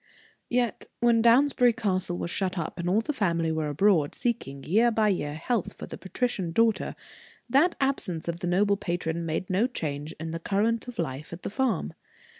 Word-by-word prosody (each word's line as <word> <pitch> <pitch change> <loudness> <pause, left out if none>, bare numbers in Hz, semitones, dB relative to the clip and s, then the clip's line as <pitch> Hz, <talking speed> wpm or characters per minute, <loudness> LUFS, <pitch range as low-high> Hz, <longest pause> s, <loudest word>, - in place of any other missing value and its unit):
Yet, 240 -2 0
when 235 -1 +4
Downsbury 245 +1 +5
Castle 185 -6 -1
was 170 - -4
shut 190 -1 -1
up, 170 +1 -4
and 170 +1 -1
all 205 +5 +3
the 300 - -3
family 170 - 0
were 160 -1 -1
abroad, 155 -1 +2
seeking, 215 - -2
year 220 +8 +4
by 220 -2 +2
year, 150 -6 -1
health 210 +6 -1
for - - -8
the - - -8
patrician 190 -3 -2
daughter, 225 +5 +2 0.5
that 295 +8 +3
absence 210 -13 -1
of 170 0 -3
the 175 - -3
noble 200 +3 +3
patron 170 -3 -2
made 160 +4 -2
no 200 +6 +3
change 150 - -4
in 160 0 -4
the 165 - -4
current 220 +7 0
of 245 - -8
life 150 -2 -4
at 170 +1 -8
the - - -4
farm. 260 +1 0
190 Hz, 190 wpm, -27 LUFS, 165-235 Hz, 0.5 s, Downsbury